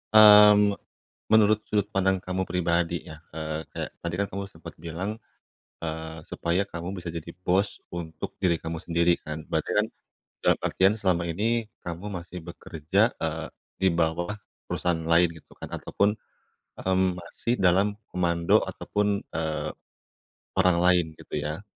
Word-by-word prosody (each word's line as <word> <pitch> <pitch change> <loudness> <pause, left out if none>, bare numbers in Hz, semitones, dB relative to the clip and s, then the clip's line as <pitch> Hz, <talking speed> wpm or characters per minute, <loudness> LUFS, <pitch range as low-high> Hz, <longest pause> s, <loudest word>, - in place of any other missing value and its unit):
mmm, 105 -1 +9 0.6
menurut 110 0 +5
sudut 105 -1 0
pandang 95 -1 +2
kamu 90 +1 -2
pribadi 85 -2 0
ya, 80 - -8 0.2
eee, 80 0 -4
kayak - - -4
tadi 85 0 -2
kan 100 - +1
kamu 100 +1 -4
sempet 85 -1 -11
bilang, 85 +6 -4 0.6
eee, 80 0 -5
supaya 85 +4 0
kamu 85 +1 -6
bisa 85 - -6
jadi 85 0 -6
bos 95 +3 +1
untuk 85 -2 -6
diri 85 -3 +3
kamu 80 0 -4
sendiri 85 0 +3
kan? 75 0 -6
Berarti - - -1
kan, - - +3 0.6
dalam - - +4
artian 95 +2 +3
selama 90 -4 +1
ini 110 +5 0 0.2
kamu 90 +4 -5
masih 90 -1 -7
bekerja, 85 +5 0
eee, 80 0 -3 0.3
di 95 - +3
bawah 85 +4 0 0.3
perusahaan 90 -2 0
lain, 85 +2 +4
gitu - - -22
kan, - - -8
ataupun, 105 +2 0 0.6
mmm, 95 -1 +1
masih 90 +7 -3
dalam 95 +3 +3
komando 85 -2 +2
ataupun, 105 0 -1
eee, 80 -1 -1 0.9
orang 90 -2 +4
lain 90 -1 +4
gitu - - -7
ya. 75 +3 -3
90 Hz, 145 wpm, -27 LUFS, 85-100 Hz, 0.9 s, mmm